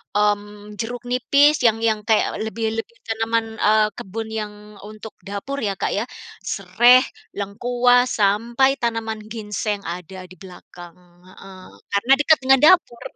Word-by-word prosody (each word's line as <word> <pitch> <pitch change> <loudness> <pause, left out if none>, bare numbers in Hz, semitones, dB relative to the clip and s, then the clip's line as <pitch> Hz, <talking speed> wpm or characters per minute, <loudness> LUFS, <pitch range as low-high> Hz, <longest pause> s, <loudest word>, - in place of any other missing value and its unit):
mmm, 205 0 -2
jeruk 245 +2 -5
nipis 280 +5 +3
yang 225 0 +2
yang 220 -1 +1
kayak 220 -2 +1
lebih 220 +1 -4
lebih 465 - -8
tanaman, 225 0 -1
eee, 215 +1 +4
kebun 220 +3 -6
yang 210 -1 -6 0.3
untuk 215 +2 -11 0.2
dapur 235 +8 -5
ya, 205 -5 -2
Kak, - - -2
ya. 205 - -1 0.4
Sereh, 240 +7 +4 0.3
lengkuas, 245 +5 +1
sampai 235 +7 +2
tanaman 225 -2 -3
ginseng 210 -2 -4
ada 180 +2 -7
di 185 0 -14
belakang, 175 -2 -13 0.3
heeh, 185 0 -14 0.3
karena 200 +7 +3
dekat 310 +1 +4
dengan 265 0 +5
dapur. 315 -8 +4
220 Hz, 135 wpm, -21 LUFS, 200-245 Hz, 0.4 s, dengan